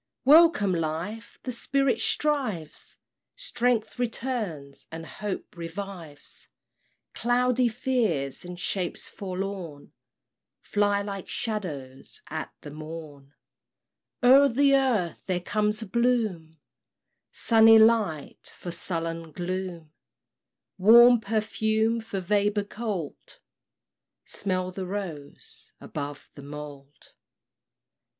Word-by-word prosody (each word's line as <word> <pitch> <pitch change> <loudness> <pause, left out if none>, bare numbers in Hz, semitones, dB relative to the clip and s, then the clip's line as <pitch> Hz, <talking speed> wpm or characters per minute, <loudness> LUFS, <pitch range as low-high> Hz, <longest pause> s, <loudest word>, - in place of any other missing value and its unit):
Welcome, 305 - +6
Life! 170 +7 -4
the 255 - -3
Spirit 275 +2 +1
strives! 255 - -1 0.4
Strength 245 - -1
returns, 220 - -3
and 165 0 -7
hope 195 +7 -6
revives; 170 -3 -8 0.7
Cloudy 245 +1 +2
fears 220 - -1
and 175 0 -8
shapes 180 -1 -2
forlorn 185 -6 -6 0.7
Fly 205 -1 +1
like 200 -2 -6
shadows 155 - -5
at - - -4
the 145 - -9
morn, 155 -2 -9 0.9
O'er 270 +3 +8
the 275 +3 +4
earth 230 - +1
there 185 -2 0
comes 210 +4 0
a - - -6
bloom 220 -8 0 0.8
Sunny 225 -1 +6
light 220 -9 +2
for 175 - -6
sullen 165 -1 -4
gloom, 175 -2 -5 0.9
Warm 235 +4 +8
perfume 220 +1 0
for 205 -3 -4
vapor 205 +2 +1
cold 205 -7 -6 0.9
smell 185 -2 -2
the 185 0 -5
rose 180 -8 -7
above 145 -1 -7
the 140 - -11
mould! 145 0 -10
200 Hz, 95 wpm, -27 LUFS, 165-230 Hz, 0.9 s, O'er